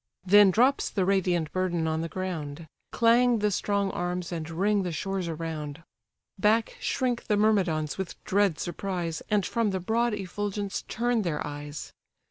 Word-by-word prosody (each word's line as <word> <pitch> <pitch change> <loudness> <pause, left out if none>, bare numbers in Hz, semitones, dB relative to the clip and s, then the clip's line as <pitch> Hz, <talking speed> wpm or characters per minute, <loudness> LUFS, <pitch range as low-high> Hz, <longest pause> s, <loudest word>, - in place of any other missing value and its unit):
Then 205 +1 +7
drops 250 +8 +3
the 190 -3 0
radiant 180 -5 +1
burden 180 -3 0
on 160 0 0
the 165 - -3
ground; 165 -4 -4 0.3
Clang 240 +1 +4
the 210 -1 +1
strong 200 0 0
arms, 175 0 -3
and 165 -2 -4
ring 200 +5 +1
the 180 -2 -2
shores 190 +3 -2
around; 160 -1 -5 0.6
Back 220 +3 +2
shrink 245 -2 -1
the 210 - +2
Myrmidons 185 -8 +1
with 190 -3 -4
dread 195 -4 +2
surprise, 175 -2 -3
And 210 -2 +2
from 230 -3 0
the 190 -1 -1
broad 225 +4 +1
effulgence 200 +1 -3
turn 240 0 0
their 165 -6 -2
eyes. 145 0 -7
190 Hz, 155 wpm, -27 LUFS, 165-210 Hz, 0.6 s, Then